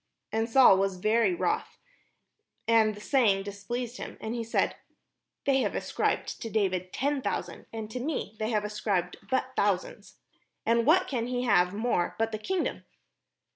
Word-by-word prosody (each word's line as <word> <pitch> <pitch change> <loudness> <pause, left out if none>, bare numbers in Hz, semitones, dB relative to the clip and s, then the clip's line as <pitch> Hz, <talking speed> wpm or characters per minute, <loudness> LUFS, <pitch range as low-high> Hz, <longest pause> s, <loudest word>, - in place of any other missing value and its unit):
And 225 +1 0
Saul 230 -6 +7
was 195 -1 0
very 215 0 +2
wroth, 430 - -1 0.9
and 220 -2 +4
the - - -10
saying 210 -5 +2
displeased 230 +5 -5
him; - - -7
and 220 - -4
he 235 -1 -2
said, 230 - 0 0.7
"They 275 -1 +3
have - - 0
ascribed - - -1
unto 225 - -6
David 185 -4 0
ten 280 +1 0
thousands, - - -4
and 220 -1 -5
to 250 - -4
me 265 -5 -3
they 215 0 -1
have 210 -2 0
ascribed 205 -4 -1
but 260 0 0
thousands: 200 -3 -1 0.5
and 230 +1 +2
what 330 +5 +5
can 240 -4 -2
he 250 0 -1
have 180 -5 +3
more 215 -5 0
but 225 0 0
the 215 - -4
kingdom?" 370 - -2
225 Hz, 165 wpm, -28 LUFS, 200-245 Hz, 0.9 s, Saul